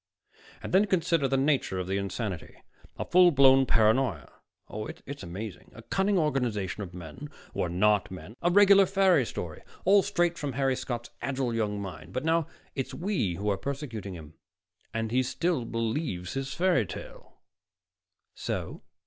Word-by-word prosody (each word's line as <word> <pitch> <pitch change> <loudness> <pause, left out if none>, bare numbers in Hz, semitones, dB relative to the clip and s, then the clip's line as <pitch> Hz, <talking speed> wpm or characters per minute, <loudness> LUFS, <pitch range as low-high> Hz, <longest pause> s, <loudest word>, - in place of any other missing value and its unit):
"And - - -6
then 195 +3 +6
consider 170 -6 +2
the 135 +1 +1
nature 135 -8 +1
of 90 - -2
the 95 +2 -1
insanity 100 -4 -4 0.4
a - - -3
full 180 0 +6
blown 135 -3 +6
paranoia 110 -1 +2 0.3
oh, 110 +1 -5 0.2
it's 140 0 -7
amazing. 95 +4 -7
A 115 - -11
cunning 195 - +1
organization 115 - 0
of 90 -3 -7
men 90 - -8 0.2
who - - -2
are 85 - 0
not 105 +4 +2
men, 95 +4 -9
a 175 - +3
regular 200 +1 +7
fairy 190 - +3
story, 80 -3 -6 0.2
all 200 +2 +6
straight 175 -4 0
from 145 -3 -3
Harry 135 +1 +1
Scott's 120 -2 -5
agile 130 -3 -1
young 105 -3 -1
mind. 90 -4 -8
But 130 +4 -2
now 165 -1 +2 0.3
it's 135 - -4
we 170 - -1
who 100 +4 -4
are 100 - 0
persecuting 120 -8 -5
him, 80 -1 -11 0.6
and 115 0 -2
he 130 +2 +3
still 130 +1 -1
believes 115 - -2
his 135 0 -3
fairy 170 - +2
tale." - - -10 1.0
"So?" - - -4
130 Hz, 165 wpm, -28 LUFS, 100-160 Hz, 1.0 s, regular